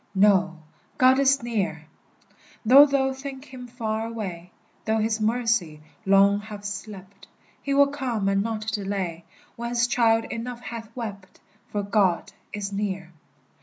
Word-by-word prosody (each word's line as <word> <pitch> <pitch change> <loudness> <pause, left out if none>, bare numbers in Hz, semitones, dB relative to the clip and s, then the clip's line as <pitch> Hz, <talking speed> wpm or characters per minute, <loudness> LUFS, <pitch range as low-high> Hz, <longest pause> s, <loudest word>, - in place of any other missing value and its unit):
Know, 190 -3 +4 0.4
God 260 +1 +5
is 275 -1 +3
near! 225 -5 -2 0.8
Though 275 +6 +9
thou 270 -1 +1
think 265 0 -8
him 255 -3 -10
far 225 -2 -3
away, 185 -7 -6 0.3
Though 220 0 0
his 220 0 0
mercy 225 -8 0 0.3
long 200 +1 +5
have 205 -1 -9
slept, 200 -1 -8 0.3
He 280 -1 -1
will 280 0 +7
come 260 -8 -2
and 195 0 +2
not 220 0 -3
delay, 195 -5 -3 0.3
When 235 0 -4
his 240 0 +2
child 225 -2 +2
enough 240 +1 -5
hath 225 +1 -7
wept, 200 -6 -7 0.3
For 205 -1 -3
God 200 -4 +1 0.2
is 200 -1 -5
near! 195 -3 -3
220 Hz, 140 wpm, -25 LUFS, 200-245 Hz, 0.8 s, Though